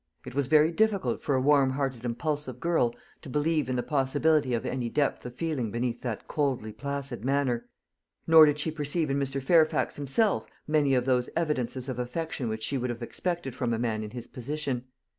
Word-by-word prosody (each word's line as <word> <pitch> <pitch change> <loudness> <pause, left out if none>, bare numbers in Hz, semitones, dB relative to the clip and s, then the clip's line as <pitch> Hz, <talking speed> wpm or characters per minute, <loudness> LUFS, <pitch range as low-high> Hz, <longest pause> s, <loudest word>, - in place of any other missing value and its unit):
It 125 - -8
was 140 -1 0
very 155 +2 +5
difficult 210 +2 +1
for 140 - 0
a 130 - +2
warm 140 -1 +4
hearted 135 -4 -2
impulsive 130 +1 -2
girl 145 -8 +1 0.3
to - - -9
believe 150 0 +1
in 130 - 0
the 125 - 0
possibility 145 -1 +2
of 115 - -3
any 125 -2 -2
depth 145 +3 0
of 125 - -10
feeling 145 -7 -2
beneath 120 +2 -2
that 120 -5 -4
coldly 135 -7 -1
placid 140 -4 -4
manner. 135 -3 0 0.6
Nor 160 -1 +8
did 150 0 +1
she 155 +2 -1
perceive 150 0 -1
in 140 - +1
Mr. 135 0 -1
Fairfax 160 +2 +3
himself 145 - +1 0.2
many 150 -3 +3
of 125 -1 +1
those 125 -2 +1
evidences 130 -6 -1
of 130 -2 -4
affection 125 0 -3
which 110 0 -4
she 135 +4 -1
would 125 +1 -2
have 120 0 -4
expected 170 +1 -3
from 125 -2 -1
a - - -3
man 110 -2 -1
in 105 - -6
his 120 +1 -7
position. 130 0 -3
135 Hz, 200 wpm, -28 LUFS, 125-150 Hz, 0.6 s, Nor